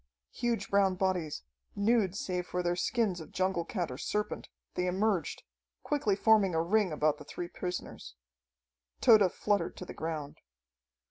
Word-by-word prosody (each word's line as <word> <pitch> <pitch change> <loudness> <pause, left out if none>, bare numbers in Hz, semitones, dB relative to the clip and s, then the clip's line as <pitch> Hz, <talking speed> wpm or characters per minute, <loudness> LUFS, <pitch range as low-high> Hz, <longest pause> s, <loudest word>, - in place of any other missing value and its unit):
Huge 240 -1 -1
brown 195 -2 +4
bodies, 180 - -1 0.3
nude 200 -2 +2
save 180 -2 -3
for 180 0 -2
their 175 0 +1
skins 200 -1 0
of 160 - -11
jungle 185 -2 0
cat 175 - -3
or 125 - -7
serpent, 210 0 -2 0.2
they 180 - -1
emerged, 190 0 0 0.4
quickly 270 -9 +1
forming 205 -4 +4
a 160 - +3
ring 200 +1 +2
about 150 0 +1
the - - -9
three 175 +4 -6
prisoners. 180 - -6 0.8
Tode 205 -5 +6
fluttered 205 -5 0
to 180 - -6
the - - -8
ground. 155 -3 -5
185 Hz, 150 wpm, -31 LUFS, 170-205 Hz, 0.8 s, Tode